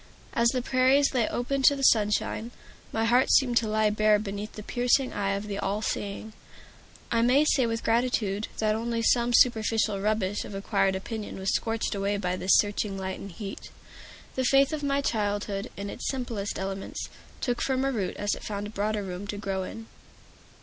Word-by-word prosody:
As 235 0 +3
the 255 0 -1
prairies 265 +3 +3
lay 240 -4 +2
open 270 +3 -1
to 285 +2 +6
the 275 - -5
sunshine, 215 0 +2 0.4
my 225 0 0
heart 245 +3 +3
seemed 250 -3 +4
to 230 - +2
lie 215 0 +2
bare 215 0 +4
beneath 205 0 -5
the 210 - -8
piercing 245 +4 +1
eye 195 -1 -1
of 200 +1 -4
the 200 -1 -4
All 205 +3 -2
Seeing. 205 +1 -4 0.8
I 230 - +3
may 255 +5 +4
say 260 -5 +3
with 230 0 -3
gratitude 225 -3 0
that 215 -1 +1
only 230 +1 -2
some 240 +1 +3
superficial 220 -4 +3
rubbish 205 -1 0
of 200 - -8
acquired 195 -1 +1
opinion 210 +2 -5
was 190 0 -1
scorched 225 0 -1
away 200 0 -1
by 180 -2 -1
this 185 +1 +4
searching 205 -1 0
light 190 0 -4
and 200 - -8
heat. 195 +3 -8 0.6
The 260 - -1
faith 275 +3 +4
of 305 - -2
my 280 -1 +1
childhood, 205 -4 -2
in 200 +1 -5
its - - -4
simplest 235 -6 -3
elements, 195 0 -4 0.3
took 245 -2 -1
firmer 265 0 +1
root 205 -7 -3
as 205 0 0
it - - -7
found 205 0 -5
broader 210 0 -1
room 185 +1 -6
to 205 - -4
grow 195 -2 -2
in. 225 +4 -7
215 Hz, 185 wpm, -27 LUFS, 200-245 Hz, 0.8 s, to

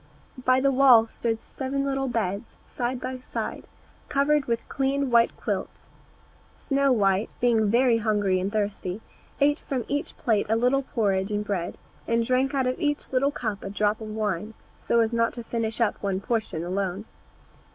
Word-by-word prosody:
By 255 0 +5
the 275 +1 +3
wall 255 -4 +7
stood 225 0 -3
seven 275 +1 -3
little 270 -1 -1
beds, 220 -2 -3
side 245 +1 -3
by 255 0 -5
side, 250 - -5 0.4
covered 290 0 +2
with 230 -1 -2
clean 275 0 0
white 235 0 +4
quilts. - - -4 0.7
Snow 275 -1 +1
white, 200 -3 +1
being 225 -4 +3
very 240 +1 +4
hungry 205 -4 +1
and 190 +2 -2
thirsty, 205 -2 -2 0.4
ate 290 +2 +3
from 260 -5 -3
each 285 +1 -3
plate 220 -4 +1
a 225 - +3
little 250 +4 +2
porridge 200 -7 0
and 210 0 -2
bread, 185 -4 -3 0.3
and 230 0 +1
drank 260 +3 +1
out 265 -1 +1
of 255 0 -1
each 290 -1 -1
little 265 +2 +2
cup 215 -8 -4
a - - -4
drop 210 +2 0
of 220 - -6
wine, 215 -1 -3 0.2
so 235 - +2
as 225 +1 0
not 230 0 +1
to 240 - -7
finish 225 -1 -2
up 230 -3 +1
one 195 -2 -1
portion 215 -6 -2
alone. 190 +2 -2
230 Hz, 170 wpm, -26 LUFS, 210-260 Hz, 0.7 s, wall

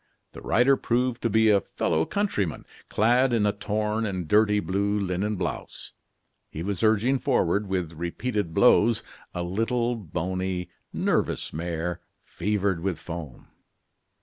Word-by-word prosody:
The - - -11
rider 125 +4 +4
proved 125 +1 0
to 115 - +1
be 110 0 +4
a 100 -1 +4
fellow 80 -1 -1
countryman, 105 - -1 0.2
clad 120 +4 +3
in 110 -3 +2
a 105 - +3
torn 105 +1 -1
and 95 -6 -3
dirty 105 +3 +4
blue 100 +1 0
linen 100 +2 -1
blouse. - - -5 0.6
He 80 - -6
was 100 0 -3
urging 110 +4 +3
forward, 105 -7 +1
with 90 -4 -2
repeated 85 +4 -3
blows, 115 +3 +4 0.3
a 90 - -2
little, 115 +6 0
bony, 90 -1 -3 0.2
nervous - - 0
mare, 85 +1 -3 0.2
fevered 100 -2 -1
with 90 -1 -2
foam. 80 -7 -8
100 Hz, 135 wpm, -26 LUFS, 90-110 Hz, 0.6 s, rider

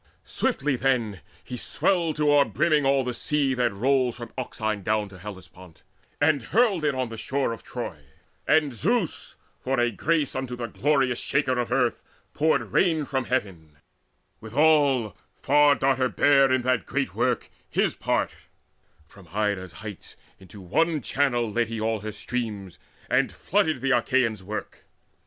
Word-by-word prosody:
Swiftly 140 -1 0
then 120 -8 0 0.2
He 125 - -7
swelled 165 +5 0
to 150 -1 +2
overbrimming 145 +1 +3
all 135 -1 +3
the 125 -1 -3
sea 140 +2 0
That 125 -2 +1
rolls 125 +3 +1
from 120 -1 -8
Euxine 110 -5 -3
down 105 +1 0
to 95 -2 -13
Hellespont, 95 -3 -12 0.4
And 145 -1 +3
hurled 200 - +2
it 145 -2 +1
on 130 -2 -2
the 115 - -7
shore 130 +2 -1
of 115 - -9
Troy: 120 -10 -6 0.5
and 155 -3 +3
Zeus, 190 - -1 0.2
For 135 0 -1
a 120 0 +2
grace 155 +5 0
unto 130 -2 -3
the 120 -1 -4
glorious 135 -1 +1
Shaker 135 -3 0
of 120 - -2
Earth, 125 -3 +1 0.3
Poured 140 -9 +1
rain 160 - +2
from 130 -2 -2
heaven: 90 - -3 0.6
withal 135 - +2 0.2
Far 145 +1 +4
darter 130 -2 +1
bare 135 -1 +4
In 130 -1 +2
that 130 -2 0
great - - -2
work - - -1 0.2
his - - +1
part; - - -1 0.7
from 95 +3 -17
Ida's 100 -3 -1
heights 105 -5 -9 0.2
Into 95 +1 -13
one 155 - 0
channel 120 -4 +1
led 120 +1 0
he 115 0 -5
all 110 0 -1
her 110 +2 -5
streams, 105 -4 -5 0.3
And - - +2
flooded 165 -9 0
the 135 0 0
Achaeans' 120 -4 +1
work. 105 +3 -6
125 Hz, 155 wpm, -25 LUFS, 110-145 Hz, 0.7 s, Far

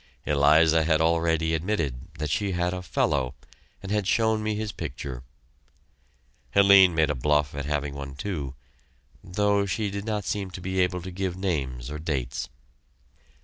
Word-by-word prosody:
Eliza 80 +3 +4
had 80 -1 +2
already 80 0 +2
admitted 80 -6 -2
that 75 -1 -3
she 100 +3 0
had 90 0 0
a 90 - -4
"fellow," 65 -5 0 0.5
and 95 - -6
had 105 -3 0
shown 110 -1 +2
me 110 0 -1
his 105 0 -3
picture. 65 -6 -6 1.3
Helene 100 -3 +7
made 80 -2 +3
a - - 0
bluff 75 +2 +1
at 70 0 -4
having 75 -1 -2
one, 70 -1 -7
too, 70 -5 -4 0.7
though 100 +2 +1
she 100 +2 -1
did 100 +1 -5
not 105 -3 -2
seem 100 -2 -3
able 90 -1 0
to 95 - -6
give 90 -1 -3
names 70 -9 -2
or 75 - -5
dates. 70 -6 -3
85 Hz, 150 wpm, -26 LUFS, 75-100 Hz, 1.3 s, Helene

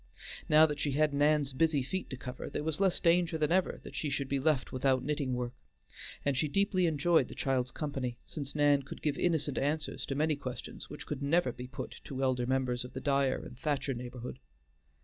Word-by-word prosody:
Now 155 +1 +8
that 150 -2 -2
she 145 -2 0
had 150 +1 +2
Nan's 145 -1 +3
busy 150 0 +2
feet 185 +8 -3
to 130 - -5
cover, 125 0 -6
there - - -3
was 160 +1 -1
less 195 -2 +3
danger 170 -1 +3
than 155 0 +1
ever 185 +1 +2
that - - -9
she 150 - -2
should 140 -1 -1
be 140 0 0
left 145 -2 +1
without 130 0 +2
knitting 140 -3 -1
work, 125 0 -3 0.7
and 140 -1 +2
she 150 +4 +1
deeply 185 +2 +2
enjoyed 160 +2 +3
the - - -10
child's 130 -2 0
company, 135 -6 -3
since 140 -2 -5
Nan 145 -1 +4
could 135 - -10
give 150 -2 +1
innocent 155 -5 +1
answers 150 +3 -1
to 135 - -2
many 155 +1 +2
questions 130 -3 -7
which - - -8
could 145 -2 -4
never 140 -1 +2
be 125 +1 -8
put 130 - -7
to 135 0 -3
elder 125 -2 +1
members 130 -2 0
of 125 - -10
the 130 - -4
Dyer 140 -2 +1
and 125 - -11
Thacher 145 -2 0
neighborhood. 125 - -7
140 Hz, 210 wpm, -32 LUFS, 130-155 Hz, 0.7 s, Now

